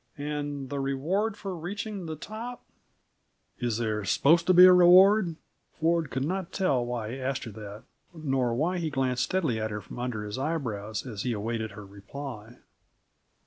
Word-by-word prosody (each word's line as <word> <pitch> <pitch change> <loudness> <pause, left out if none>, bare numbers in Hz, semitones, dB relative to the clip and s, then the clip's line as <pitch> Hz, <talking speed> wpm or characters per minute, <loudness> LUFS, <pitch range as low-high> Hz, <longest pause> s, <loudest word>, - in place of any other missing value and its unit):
"And 145 -2 -4
the 140 - -2
reward 170 +11 -1
for 195 -3 -5
reaching 195 +2 -5
the 160 - -4
top 225 +9 -7 0.5
" - - -45
"Is 110 -2 -1
there 110 -2 -1
supposed 165 - +3
to 185 - +6
be 180 +1 +10
a 185 - +9
reward?" 180 +1 +6 0.4
Ford 165 -1 +1
could 130 +1 -2
not 185 +2 -3
tell 140 -11 +1
why 120 -2 -4
he 130 +2 -6
asked 130 0 -2
her 115 - -7
that, 105 0 -9 0.3
nor 135 -7 -1
why 175 +7 0
he 165 -2 -1
glanced 130 -3 0
stealthily 155 -12 0
at 110 0 -2
her 105 0 -4
from 115 - -10
under 120 -4 -3
his 105 +4 -5
eyebrows 115 -9 -3
as 110 -6 -5
he 125 0 -1
awaited 110 0 -3
her 105 0 -10
reply. 110 +3 -9
135 Hz, 180 wpm, -28 LUFS, 115-175 Hz, 0.5 s, be